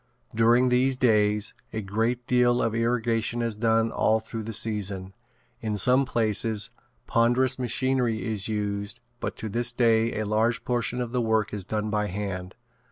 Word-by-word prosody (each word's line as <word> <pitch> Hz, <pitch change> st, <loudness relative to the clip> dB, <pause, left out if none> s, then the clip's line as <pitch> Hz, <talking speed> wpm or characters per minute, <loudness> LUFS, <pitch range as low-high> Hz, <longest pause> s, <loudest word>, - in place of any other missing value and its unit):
During 120 Hz, +3 st, +4 dB
these 130 Hz, +2 st, +2 dB
days 105 Hz, -3 st, +2 dB, 0.2 s
a 110 Hz, -1 st, -4 dB
great 115 Hz, +5 st, -1 dB
deal 125 Hz, -1 st, +3 dB
of 115 Hz, -, 0 dB
irrigating 115 Hz, 0 st, 0 dB
is 115 Hz, -2 st, -1 dB
done 115 Hz, +1 st, +1 dB
all 110 Hz, 0 st, +2 dB
through 110 Hz, 0 st, -7 dB
the 110 Hz, +1 st, -6 dB
season. 100 Hz, -4 st, -2 dB, 0.5 s
In 105 Hz, -2 st, -3 dB
some 125 Hz, +7 st, +4 dB
places 110 Hz, -3 st, +1 dB, 0.3 s
ponderous 120 Hz, +3 st, +2 dB
machinery 125 Hz, -2 st, 0 dB
is 105 Hz, -4 st, 0 dB
used 105 Hz, 0 st, -3 dB, 0.2 s
but -, -, -4 dB
to 110 Hz, -, -5 dB
this 120 Hz, +3 st, +1 dB
day 115 Hz, -2 st, +2 dB
a 110 Hz, -, -1 dB
large 110 Hz, +3 st, 0 dB
portion 125 Hz, 0 st, -1 dB
of 120 Hz, -1 st, -5 dB
work 110 Hz, -4 st, 0 dB
is 100 Hz, -3 st, -3 dB
done 105 Hz, +1 st, -2 dB
by 105 Hz, 0 st, 0 dB
hand. 95 Hz, -2 st, -5 dB
115 Hz, 160 wpm, -26 LUFS, 105-120 Hz, 0.5 s, During